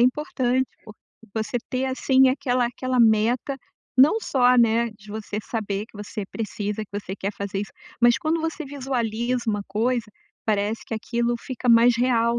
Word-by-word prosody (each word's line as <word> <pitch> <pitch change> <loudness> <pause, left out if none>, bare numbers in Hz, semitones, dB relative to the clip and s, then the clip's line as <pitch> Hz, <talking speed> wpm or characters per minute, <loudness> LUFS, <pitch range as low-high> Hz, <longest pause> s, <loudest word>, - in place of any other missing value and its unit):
importante 255 -1 +1 0.2
porque 215 -1 -14 0.3
você 220 +2 -2
ter, 260 +1 0
assim, 260 0 +4
aquela 255 -2 +1
aquela 255 +1 -2
meta. 230 +4 +3 0.4
Não 300 +12 +7
só, 250 - +3
né, 230 0 +3
de 210 -1 -15
você 210 -1 -5
saber 210 -2 -3
que - - -17
você 205 0 -6
precisa, 210 -1 -3
que - - -29
você 190 -1 -7
quer 200 +1 -3
fazer 200 0 -3
isso. 205 - -6 0.3
Mas 240 +2 +5
quando 320 +1 0
você 325 0 -3
visualiza 250 -3 -2
uma 205 -1 0
coisa, 230 +4 0 0.4
parece 210 +1 0
que - - -8
aquilo 235 +2 -1
fica 255 -1 -6
mais 235 0 +6
real, 235 -1 +2
235 Hz, 165 wpm, -24 LUFS, 215-255 Hz, 0.4 s, Não